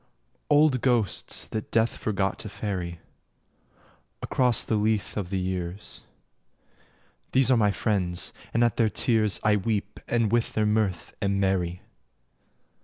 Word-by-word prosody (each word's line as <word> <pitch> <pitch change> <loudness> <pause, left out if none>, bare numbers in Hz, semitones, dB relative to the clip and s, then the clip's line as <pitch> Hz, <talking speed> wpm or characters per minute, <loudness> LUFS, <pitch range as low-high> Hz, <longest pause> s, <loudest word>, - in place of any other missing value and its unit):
Old 145 -4 +4
ghosts 120 -7 0
that 110 - -4
death 115 0 +1
forgot 100 -2 -1
to 105 - -7
ferry 90 -5 -4 1.2
Across 125 -2 +2
the - - -2
Lethe 105 0 0
of 100 -4 -3
the 95 - -1
years 90 +1 -4 1.3
These 130 0 +4
are 125 - +5
my 105 -2 +3
friends, 90 -3 -1 0.2
and 115 - +2
at 120 - +1
their 115 -2 +3
tears 110 -1 +2
I 105 -1 +4
weep 105 0 -2
and 115 -3 +1
with 120 0 +1
their 110 - +1
mirth 105 -5 0
am 100 0 0
merry. 90 -2 0
105 Hz, 135 wpm, -26 LUFS, 95-115 Hz, 1.3 s, are